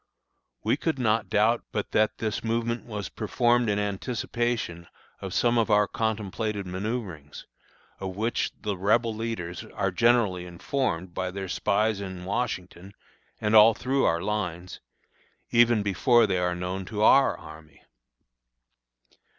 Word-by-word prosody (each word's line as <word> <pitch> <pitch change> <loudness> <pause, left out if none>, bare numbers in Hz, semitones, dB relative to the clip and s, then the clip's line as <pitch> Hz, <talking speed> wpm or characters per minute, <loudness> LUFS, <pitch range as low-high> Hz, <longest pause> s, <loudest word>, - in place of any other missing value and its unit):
We - - +1
could 160 -3 -1
not 115 -3 +1
doubt 110 +3 +2
but 105 - -3
that 110 0 +2
this 110 0 -3
movement 115 +1 -1
was 105 -4 -4
performed 120 +2 +1
in 100 - +1
anticipation 105 -3 -2 0.3
of - - -5
some 120 0 +2
of 115 - +1
our 105 -1 +4
contemplated 110 -2 -2
manoeuvrings, 95 - -5 0.5
of 95 -1 -5
which 110 +4 -1
the 105 -2 -3
Rebel 110 +5 +2
leaders 105 -6 -4
are 95 - -2
generally 105 -4 +2
informed 90 -1 -2
by 95 0 -2
their 95 +1 -5
spies 105 +3 0
in 95 -2 -7
Washington 95 -3 -4 0.4
and 105 +1 +1
all 110 +1 +8
through 135 +2 0
our 85 +1 +1
lines, 90 -4 -3 0.7
even 120 -2 +4
before 115 +5 +4
they 95 -1 0
are 90 0 0
known 90 +2 -4
to 105 +2 -2
our 135 +4 +5
army. 80 -1 -14
105 Hz, 135 wpm, -26 LUFS, 95-115 Hz, 0.7 s, all